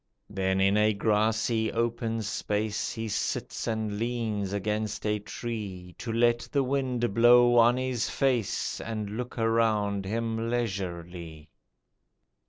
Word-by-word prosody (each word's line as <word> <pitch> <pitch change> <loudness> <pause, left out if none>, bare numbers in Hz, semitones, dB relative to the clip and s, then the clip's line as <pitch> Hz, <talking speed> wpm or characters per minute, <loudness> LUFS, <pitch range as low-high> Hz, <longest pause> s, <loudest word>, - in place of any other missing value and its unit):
Then 95 -1 0
in 95 +2 +3
a 105 0 +3
grassy 110 +1 +1
open 115 -1 -1
space 105 +1 -2
He 115 0 -4
sits 105 - -2
and 110 -2 -2
leans 110 -4 -2
against 105 +2 -2
a 105 0 +1
tree, 100 -5 -6
To 115 - -4
let 120 +1 +3
the 140 -2 +2
wind 125 -4 -1
blow 120 +2 +6
on 120 +2 +5
his 130 -3 -1
face 125 -7 0
And 110 -2 -4
look 125 +4 -5
around 110 -3 +1
him 115 +2 -2
leisurely. 90 -8 -4
110 Hz, 125 wpm, -28 LUFS, 100-120 Hz, -, blow